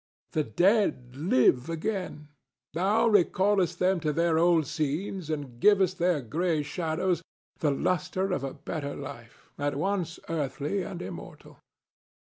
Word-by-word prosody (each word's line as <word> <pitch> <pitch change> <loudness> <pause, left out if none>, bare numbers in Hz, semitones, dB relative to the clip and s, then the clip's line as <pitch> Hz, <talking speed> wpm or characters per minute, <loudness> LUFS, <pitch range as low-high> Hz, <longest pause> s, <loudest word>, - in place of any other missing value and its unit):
The 155 - +1
dead 150 - +2
live 130 -2 +3
again; 165 -3 -3 0.4
thou 200 +7 +2
recallest 195 -2 +3
them 185 0 +2
to 155 -2 0
their 165 +1 +2
old 170 -2 +4
scenes 155 +4 -3
and 140 -6 -4
givest 190 +1 +4
their 175 -4 +2
gray 160 +5 0
shadows 170 +3 -1 0.4
the 150 - +2
lustre 180 +6 0
of 180 - -1
a 135 - -4
better 140 -3 -5
life, 120 -4 -10
at 145 0 -1
once 175 +1 -1
earthly 150 +3 -2
and 180 -1 -6
immortal. - - -10
165 Hz, 130 wpm, -28 LUFS, 145-185 Hz, 0.4 s, old